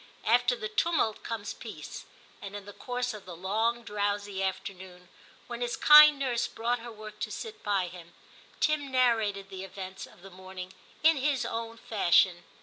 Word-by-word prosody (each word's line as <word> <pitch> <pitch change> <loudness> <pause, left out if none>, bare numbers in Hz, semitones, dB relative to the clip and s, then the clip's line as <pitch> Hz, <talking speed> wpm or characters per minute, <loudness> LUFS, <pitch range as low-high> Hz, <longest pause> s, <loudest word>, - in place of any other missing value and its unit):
After 245 +2 +4
the 215 - -4
tumult 220 -1 0
comes 220 -3 -5
peace, - - -9 0.4
and 200 0 -7
in 205 -1 -7
the 205 - -10
course 245 +1 -3
of 210 -3 -11
the 175 - -7
long, 220 +7 0
drowsy 205 -2 -2
afternoon, 185 -1 -5 0.4
when 240 0 -7
his 240 0 -2
kind 300 0 +9
nurse 250 -4 0
brought 235 +2 -1
her 235 +1 -8
work 215 -1 -11
to - - -3
sit 445 -2 -7
by 200 -3 +1
him, 175 -1 -11 0.4
Tim 305 -2 +1
narrated 220 -6 +2
the 190 0 -7
events 190 0 -8
of 175 - -19
the 195 - -11
morning 185 0 -9 0.3
in 320 -1 +6
his 275 -1 0
own 230 0 -4
fashion. 180 -5 +3
215 Hz, 170 wpm, -29 LUFS, 190-245 Hz, 0.4 s, kind